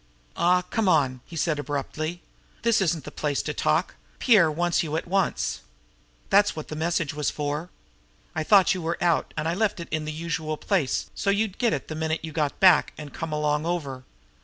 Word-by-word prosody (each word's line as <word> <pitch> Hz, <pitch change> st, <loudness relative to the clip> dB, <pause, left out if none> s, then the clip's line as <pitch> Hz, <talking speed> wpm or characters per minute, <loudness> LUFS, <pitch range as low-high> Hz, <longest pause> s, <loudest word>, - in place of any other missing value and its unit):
"Aw, 180 Hz, +2 st, +3 dB
come 195 Hz, +2 st, 0 dB
on!" 130 Hz, -7 st, +2 dB
he 170 Hz, -, -10 dB
said 155 Hz, -2 st, 0 dB
abruptly. 150 Hz, +4 st, -4 dB, 0.4 s
"This 230 Hz, -3 st, +3 dB
isn't 165 Hz, -4 st, 0 dB
the -, -, -8 dB
place 145 Hz, -2 st, -1 dB
to -, -, -3 dB
talk. -, -, +1 dB, 0.2 s
Pierre 205 Hz, -10 st, +5 dB
wants 175 Hz, +2 st, +1 dB
you 155 Hz, -3 st, -3 dB
at -, -, -3 dB
once. 195 Hz, +1 st, 0 dB, 0.7 s
That's 205 Hz, +1 st, +4 dB
what 155 Hz, -, -7 dB
the 155 Hz, -, -5 dB
message 160 Hz, -1 st, -1 dB
was 150 Hz, -1 st, -1 dB
for. 150 Hz, +3 st, -3 dB, 0.6 s
I 160 Hz, -, -1 dB
thought 195 Hz, +3 st, +5 dB
you 185 Hz, -, -4 dB
were 165 Hz, +1 st, -2 dB
out, 170 Hz, -2 st, +1 dB
and 155 Hz, -, -1 dB
I 165 Hz, -, +1 dB
left 210 Hz, 0 st, 0 dB
it 170 Hz, -, -7 dB
in 155 Hz, 0 st, -1 dB
the 155 Hz, -, -3 dB
usual 160 Hz, -1 st, -3 dB
place 170 Hz, -9 st, -1 dB
so 200 Hz, -, -2 dB
you'd 200 Hz, 0 st, 0 dB
get 235 Hz, -, +2 dB
it 140 Hz, -, -3 dB
the -, -, -5 dB
minute 160 Hz, 0 st, -2 dB
you 160 Hz, -, -7 dB
got 150 Hz, -2 st, -1 dB
back 185 Hz, -5 st, +5 dB
and 150 Hz, -2 st, -9 dB
come 165 Hz, -1 st, -5 dB
along 150 Hz, +1 st, 0 dB
over. 140 Hz, -7 st, -3 dB
160 Hz, 205 wpm, -25 LUFS, 150-180 Hz, 0.7 s, Pierre